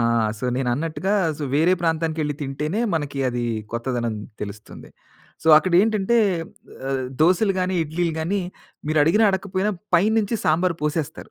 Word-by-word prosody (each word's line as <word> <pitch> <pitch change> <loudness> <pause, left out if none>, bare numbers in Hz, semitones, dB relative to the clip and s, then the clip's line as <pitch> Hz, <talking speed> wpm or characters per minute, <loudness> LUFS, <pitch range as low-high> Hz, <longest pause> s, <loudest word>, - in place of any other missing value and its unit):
ఆ! - - +2 0.4
So, - - -6
నేనన్నట్టుగా 150 +8 -1 0.3
so, 150 - -3
వేరే 160 +5 +4
ప్రాంతానికెళ్లి 160 -2 0
తింటేనే 150 +8 -2
మనకి 145 -3 -3
అదీ 120 -1 -2 0.3
కొత్తదనం 120 -1 -2 0.3
తెలుస్తుంది. 105 +1 -9 0.6
సో, - - +2
అక్కడేంటంటే, 195 +6 +2 0.7
ఆహ్, 135 -1 -1 0.2
దోసలు 185 +4 +3
గానీ, 185 0 0
ఇడ్లీలు 165 +2 -2
గానీ, 190 +5 -1 0.5
మీరడిగినా, 160 +8 +4
అడక్కపోయినా 190 +1 -1 0.2
పై 175 - +3
నించి 220 +1 0
సాంబార్ 170 +3 +2
పోసేస్తారు. 150 0 -3
160 Hz, 125 wpm, -22 LUFS, 145-185 Hz, 0.7 s, వేరే